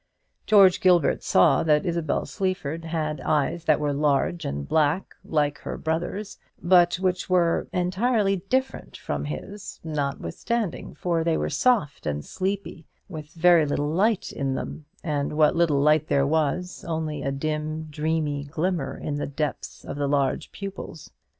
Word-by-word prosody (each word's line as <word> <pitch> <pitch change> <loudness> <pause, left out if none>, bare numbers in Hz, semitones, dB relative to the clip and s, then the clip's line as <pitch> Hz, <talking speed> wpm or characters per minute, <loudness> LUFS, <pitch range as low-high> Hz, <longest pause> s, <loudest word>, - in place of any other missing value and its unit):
George 195 -4 +6
Gilbert 175 -5 +4
saw - - +4
that 150 -2 +2
Isabel 170 -4 -1
Sleaford 165 -5 -3
had 155 -3 -2
eyes 155 +2 0
that 155 - +3
were 145 -1 0
large 145 +3 +1
and 70 0 -4
black, 155 +4 +1
like 145 -3 0
her - - -6
brother's, 175 +6 -3 0.2
but 175 -1 +4
which 185 0 -1
were 175 -2 +2
entirely 195 +3 +1
different 260 +1 -1
from 75 0 -4
his, 190 - -7
notwithstanding; 155 - -3
for 170 -2 0
they 165 -1 +1
were - - -2
soft 150 - +1
and 75 0 -2
sleepy, 190 -4 -4 0.2
with 155 -5 -8
very 170 -2 +5
little 145 +1 -1
light 200 +6 +1
in 135 -2 -2
them, 155 - -6 0.2
and 145 -3 -1
what 150 +1 +4
little 165 -4 +3
light 150 +1 +3
there 140 -1 +2
was, 160 +4 -1
only 160 -3 -3
a 135 0 -1
dim 155 +2 -3
dreamy 150 -1 -2
glimmer 155 -2 -2
in 145 - -4
the 145 - -3
depths 145 0 -4
of 140 - -6
the 145 -1 0
large 140 -1 0
pupils. 195 -6 -8
160 Hz, 150 wpm, -25 LUFS, 145-180 Hz, 0.2 s, George